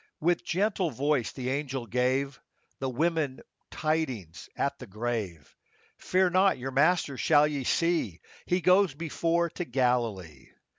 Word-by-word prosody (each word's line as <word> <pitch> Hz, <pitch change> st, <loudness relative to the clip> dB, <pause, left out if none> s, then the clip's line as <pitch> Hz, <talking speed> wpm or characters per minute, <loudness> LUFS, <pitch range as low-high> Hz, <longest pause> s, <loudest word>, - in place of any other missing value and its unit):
With 175 Hz, +3 st, +1 dB
gentle 190 Hz, -1 st, 0 dB
voice 140 Hz, -2 st, 0 dB
the 130 Hz, -1 st, -4 dB
angel 135 Hz, -3 st, -3 dB
gave 130 Hz, +4 st, 0 dB, 0.4 s
The 135 Hz, -, -2 dB
women 150 Hz, 0 st, -1 dB, 0.3 s
tidings 130 Hz, -, -3 dB
at 140 Hz, -, -1 dB
the 125 Hz, -, -9 dB
grave, 105 Hz, -, -4 dB
— -, -, -34 dB
" -, -, -39 dB
Fear 185 Hz, 0 st, +2 dB
not, 190 Hz, 0 st, +4 dB
your 130 Hz, +2 st, -5 dB
Master 145 Hz, 0 st, +2 dB
shall 150 Hz, +3 st, +4 dB
ye 145 Hz, -3 st, -2 dB
see: 165 Hz, -, 0 dB, 0.3 s
He 180 Hz, +1 st, +1 dB
goes 180 Hz, -2 st, +4 dB
before 165 Hz, +2 st, 0 dB
to 180 Hz, -, -4 dB
Galilee." 120 Hz, -, -1 dB
140 Hz, 145 wpm, -28 LUFS, 125-165 Hz, 0.4 s, not